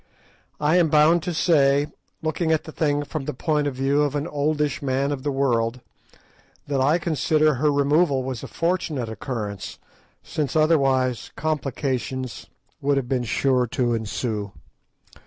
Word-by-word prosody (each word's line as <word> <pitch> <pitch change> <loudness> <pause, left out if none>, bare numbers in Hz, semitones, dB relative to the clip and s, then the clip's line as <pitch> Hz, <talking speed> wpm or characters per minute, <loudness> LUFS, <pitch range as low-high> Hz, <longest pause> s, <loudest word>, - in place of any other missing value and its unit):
I 150 +4 +3
am 170 -3 +4
bound 155 +3 +5
to 180 - -3
say, 145 -4 +3 0.4
looking 160 +1 0
at 160 - +2
the 155 - -9
thing 145 -2 0
from 145 -1 -5
the - - -4
point 150 +1 0
of 140 - -3
view 135 +2 +1
of 145 -1 0
an 145 +1 -1
oldish 150 -1 -1
man 135 +1 0
of 140 -2 -3
the 145 - -2
world, 125 -3 0 0.9
that 140 -2 -1
I 145 +5 +4
consider 155 -2 +2
her 145 +3 +1
removal 145 0 +2
was 130 -3 -4
a - - -7
fortunate 165 -8 -1
occurrence, 110 -4 -5 0.5
since, 150 -1 -3
otherwise, 135 -6 +2
complications 130 -4 -3 0.3
would 140 0 +2
have 135 -3 -1
been 125 -1 -1
sure 125 +1 +1
to 120 +1 0
ensue. 110 -2 -3
140 Hz, 155 wpm, -23 LUFS, 130-155 Hz, 0.9 s, bound